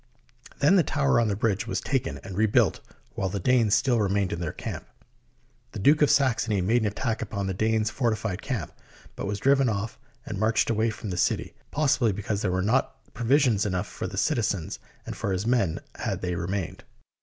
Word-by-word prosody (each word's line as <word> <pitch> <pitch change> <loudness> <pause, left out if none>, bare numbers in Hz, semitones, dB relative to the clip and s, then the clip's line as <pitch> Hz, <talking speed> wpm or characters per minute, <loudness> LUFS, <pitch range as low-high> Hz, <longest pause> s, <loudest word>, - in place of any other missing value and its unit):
Then 160 +8 +5
the 175 - +5
tower 140 -4 +2
on 115 - +2
the 100 - 0
bridge 110 +1 0
was - - -1
taken 135 -3 -2
and 95 - -7
rebuilt 110 +1 +3 0.3
while 95 - -2
the 100 - -3
Danes 115 +1 +3
still 120 +2 +2
remained 100 -2 +1
in 85 - -4
their 85 -3 -2
camp. - - -6 0.9
The - - -6
Duke 145 +10 +4
of 150 - +5
Saxony 125 -7 +2
made 110 +7 +2
an 110 - +1
attack 110 +2 -2
upon 100 -3 -3
the 95 - -2
Danes' 110 +2 +1
fortified 110 -6 -1
camp, 120 - -3 0.4
but - - -4
was 100 0 -2
driven 135 +3 +3
off 110 +2 -3 0.3
and 105 -3 -5
marched 110 +2 +2
away 110 +1 +1
from 110 -2 -6
the 90 - -3
city, 90 - 0 0.2
possibly 135 -6 +2
because 100 +1 -3
there - - 0
were 90 0 0
not 125 +6 -1
provisions 120 -3 +3
enough 95 -2 -1
for - - -6
the 95 - -7
citizens 105 - 0 0.3
and - - -6
for 100 - -2
his 95 +2 -1
men 115 -9 +1
had - - -3
they 90 -1 -2
remained. 90 +1 -3
110 Hz, 200 wpm, -26 LUFS, 100-120 Hz, 0.9 s, Then